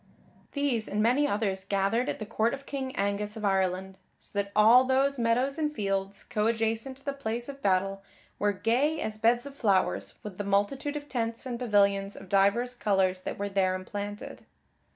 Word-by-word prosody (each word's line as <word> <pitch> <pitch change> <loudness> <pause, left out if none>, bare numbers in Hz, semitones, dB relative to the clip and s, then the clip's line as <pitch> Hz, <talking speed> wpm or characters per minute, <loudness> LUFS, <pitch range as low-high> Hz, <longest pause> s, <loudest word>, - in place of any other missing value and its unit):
These 275 -7 0
and 205 - -2
many 260 +6 +3
others 200 -5 -1
gathered 200 +5 0
at - - -2
the 215 - -6
court 225 +3 0
of 275 0 -14
King 265 -2 -4
Angus 200 +1 -1
of 215 - -4
Ireland, 190 -1 0 0.2
so - - -16
that 200 -1 -1
all 225 +4 +7
those 265 +1 +2
meadows 250 +5 +1
and 300 -1 0
fields 195 -4 -2
coadjacent 225 +3 -1
to 270 - -17
the 280 - -1
place 240 -3 -4
of 280 -1 -8
battle 195 0 +1 0.4
were 205 0 +2
gay 240 +11 +1
as 215 -6 -3
beds 235 +3 +3
of 280 - -8
flowers 200 -7 +1
with 205 -3 -8
the - - -1
multitude 205 +9 0
of 290 0 -5
tents 230 -3 -3
and 245 -2 -4
pavilions 200 -4 +2
of 190 - -11
divers 200 +6 +3
colors 195 -5 +1
that - - -5
were 200 - -2
there 190 -1 +1
emplanted. 205 +2 -6
215 Hz, 185 wpm, -28 LUFS, 200-255 Hz, 0.4 s, all